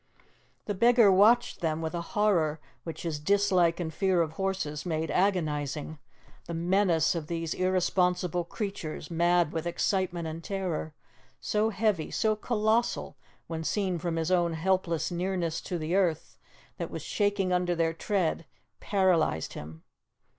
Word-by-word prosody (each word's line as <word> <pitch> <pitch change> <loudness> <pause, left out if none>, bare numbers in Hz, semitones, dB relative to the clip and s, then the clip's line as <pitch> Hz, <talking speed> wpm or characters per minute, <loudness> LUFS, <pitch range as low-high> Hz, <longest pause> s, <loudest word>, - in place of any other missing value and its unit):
The 205 - -2
beggar 235 +1 +5
watched 220 +4 +4
them 160 -2 0
with 160 -1 -3
a 170 - -2
horror 170 -6 +1 0.2
which 160 -2 -7
his 160 -3 -3
dislike 185 -1 +2
and 160 -2 -3
fear 185 0 +2
of 155 - -5
horses 160 -4 -3
made 160 -2 -2
agonizing, 155 -5 -1 0.5
the 170 - -5
menace 175 -1 +2
of 165 -3 -4
these 165 -1 -2
irresponsible 180 -1 +1
creatures, 185 -4 -5
mad 170 -1 +2
with 165 +1 -2
excitement 175 -1 -1
and 160 +1 -6
terror, 180 -6 -3 0.4
so 215 +1 +1
heavy, 205 -5 0
so 220 -1 +1
colossal 220 +1 0 0.3
when 160 -1 -5
seen 185 0 -1
from 170 0 -2
his 165 +2 -1
own 175 -2 +2
helpless 170 0 0
nearness 175 -2 -2
to 180 - -4
the 160 +1 -3
earth 180 -5 0 0.4
that - - -4
was - - -6
shaking 205 -3 0
under 180 -1 +1
their 165 -1 +1
tread, 165 -2 -1 0.3
paralyzed 180 - +1
him. 80 +2 -9
175 Hz, 145 wpm, -28 LUFS, 160-195 Hz, 0.5 s, beggar